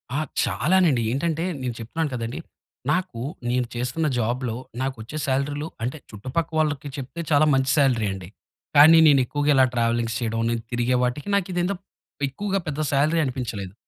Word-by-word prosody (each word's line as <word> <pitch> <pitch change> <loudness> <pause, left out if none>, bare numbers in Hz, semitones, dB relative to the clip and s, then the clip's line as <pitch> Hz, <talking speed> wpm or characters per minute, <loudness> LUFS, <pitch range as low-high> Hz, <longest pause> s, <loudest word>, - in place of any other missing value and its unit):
ఆ! - - +1 0.2
చాలానండి. 165 -6 +2
ఏంటంటే 160 +5 -1 0.2
నేను 125 -2 -2
చెప్తున్నాను 150 +8 -2
కదండీ! 115 +3 -4 0.5
నాకు 180 -11 -1 0.3
నేను 125 0 +1
చేస్తున్న 125 +6 -1
జాబ్‌లో 120 0 -1 0.3
నాకొచ్చే 130 +1 -4
సాలరీలు 145 +3 -1 0.2
అంటే 130 +6 -2
చుట్టుపక్క 130 +10 -3
వాళ్ళకి 150 -2 0
చెప్తే 140 +5 -6
చాలా 150 +1 +5
మంచి 135 0 +2
సాలరీ 125 -7 +3
అండి. 95 -2 -8 0.5
కానీ 155 +3 +9
నేను 140 -3 +6
ఎక్కువగా 145 +3 -1
ఇలా 130 -1 +6
ట్రావెలింగ్స్ 115 -1 0
చేయడం, 115 -1 -2
నేను 115 - -1
తిరిగే 120 +1 +1
వాటికి 125 +6 -2
నాకిదేందో 180 0 0 0.5
ఎక్కువగా 195 +8 -2
పెద్ద 150 0 -3
సాలరీ 150 +4 +2
అనిపించలేదు. 115 -8 -4
135 Hz, 145 wpm, -24 LUFS, 120-155 Hz, 0.5 s, కానీ